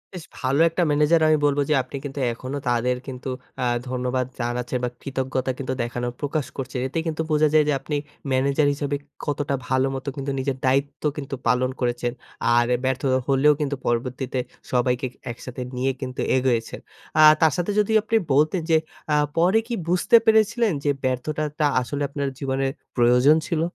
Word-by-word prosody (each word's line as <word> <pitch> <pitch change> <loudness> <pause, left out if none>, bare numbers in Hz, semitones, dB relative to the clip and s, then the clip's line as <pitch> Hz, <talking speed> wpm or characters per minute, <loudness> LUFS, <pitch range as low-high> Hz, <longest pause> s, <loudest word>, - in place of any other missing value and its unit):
বেশ 170 - -7
ভালো 135 +3 0
একটা 175 +2 0
ম্যানেজার 150 +3 +3
আমি 155 0 +4
বলবো 145 0 +2
যে - - +4
আপনি 130 - -10
কিন্তু 140 0 -5
এখনো 130 +4 -5
তাদের 125 +1 +1
কিন্তু 130 0 -6 0.3
আ - - +1 0.3
ধন্যবাদ 125 0 -1
জানাচ্ছেন 120 +1 -2
বা 125 - +1
কৃতজ্ঞতা 130 -1 -2
কিন্তু 130 -1 -3
দেখানোর 120 0 -3
প্রকাশ 145 0 -1
করছে 130 -1 -5
এতেই 160 +4 -2
কিন্তু 160 0 -2
বোঝা 155 0 +4
যায় 155 - +6
যে 150 - +3
আপনি 145 +2 -4 0.4
ম্যানেজার 140 +3 +2
হিসেবে 145 0 -2 0.3
কতটা 145 -1 -1
ভালো 130 +1 +2
মতো 135 +2 -4
কিন্তু 140 0 -3
নিজের 130 0 -2
দায়িত্ব 140 +3 0
কিন্তু 140 -1 -4
পালন 125 +2 +2
করেছেন। 120 -1 -1 0.4
আর 120 0 +4 0.2
ব্যর্থ 130 0 0 0.3
হলেও 140 +2 +4
কিন্তু 140 -1 -1
পরবর্তীতে 125 +2 -1 0.3
সবাইকে 125 +1 +1
ক - - -26 0.2
একসাথে 125 +1 -8
নিয়ে 130 +2 +1
কিন্তু 130 0 -4
এগোয়েছেন 125 -3 0 0.4
আ - - +8 0.2
তার 160 -1 +5
সাথে 175 +4 -1
যদি 210 +1 +1
আপনি 225 +1 +1 0.2
বলতেন 155 +5 +3
যে 160 - +6 0.4
আ - - +4 0.2
পরে 185 +6 +4
কি 240 - -4
বুঝতে 180 +6 +3
পেরেছিলেন 220 0 +3
যে 145 - +1
ব্যর্থতাটা 150 +4 -1 0.2
আসলে 145 +3 -4
আপনার 140 -1 -2
জীবনে 135 0 -1 0.3
প্রয়োজন 125 +5 +5
ছিল? 165 -2 0
135 Hz, 170 wpm, -23 LUFS, 125-150 Hz, 0.4 s, আ